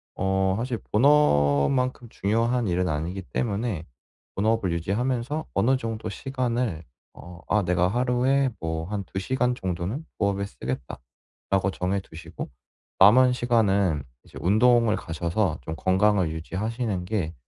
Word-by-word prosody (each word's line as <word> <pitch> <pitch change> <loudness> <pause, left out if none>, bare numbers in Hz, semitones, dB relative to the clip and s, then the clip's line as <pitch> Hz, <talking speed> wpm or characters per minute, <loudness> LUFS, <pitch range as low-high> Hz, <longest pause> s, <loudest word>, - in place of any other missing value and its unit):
어 95 0 +1
사실 120 +1 -2
본업만큼 125 - +3
중요한 115 +4 0
일은 90 0 0
아니기 80 +5 -2
때문에 105 -3 -2 0.5
본업을 110 -2 +1
유지하면서 120 - -1
어느 120 +7 +3
정도 115 -3 -4
시간을 120 - -2 0.3
어 90 0 -12
'아 105 -1 +3
내가 90 0 +2
하루에 125 +4 +2
뭐 80 0 -3
1-2 100 -2 -4
시간 125 +4 0
정도는 95 - -4
부업에 100 -1 0
쓰겠다.' 65 -8 -6 0.5
라고 95 0 +2
정해 95 +2 -1
두시고 85 -2 -9 0.5
남은 125 +6 +7
시간은 100 - +2 0.2
이제 - - -14
운동을 115 +3 +4
가셔서 85 +2 -1
좀 80 - -5
건강을 95 -1 +2
유지하시는 95 +4 -3
게 90 -5 -2
100 Hz, 280 characters per minute, -25 LUFS, 90-120 Hz, 0.5 s, 남은